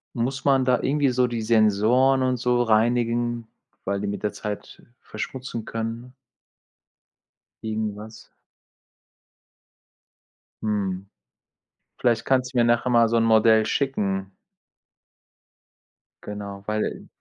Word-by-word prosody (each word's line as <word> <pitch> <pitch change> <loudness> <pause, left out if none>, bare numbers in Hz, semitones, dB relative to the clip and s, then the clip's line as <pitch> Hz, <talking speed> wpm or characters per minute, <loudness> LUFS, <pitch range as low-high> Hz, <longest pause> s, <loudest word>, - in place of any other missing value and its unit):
Muss 130 +4 -2
man 135 -2 +3
da 125 -1 +2
irgendwie 140 0 +1
so 125 0 +2
die 115 -2 -3
Sensoren 115 +4 +3
und 130 0 +1
so 125 0 +1
reinigen, 120 +1 +1 0.4
weil 100 +1 -1
die 105 - -3
mit 100 0 -4
der 105 - -1
Zeit 105 -1 -7 0.2
verschmutzen 125 -3 -6
können? 115 +3 -5 1.5
Irgendwas. 110 0 -5 2.4
Mhm. 100 -2 -2 0.9
Vielleicht 115 -2 +1
kannst 130 -1 +1
du - - -2
mir 120 - +5
nachher 120 +2 +2
mal 115 -1 +5
so 115 - +2
'n 115 - +3
Modell 110 -1 +5
schicken. 100 -8 -1 1.9
Genau, 100 -1 -7
weil 105 0 -2
115 Hz, 110 wpm, -24 LUFS, 105-125 Hz, 2.4 s, mir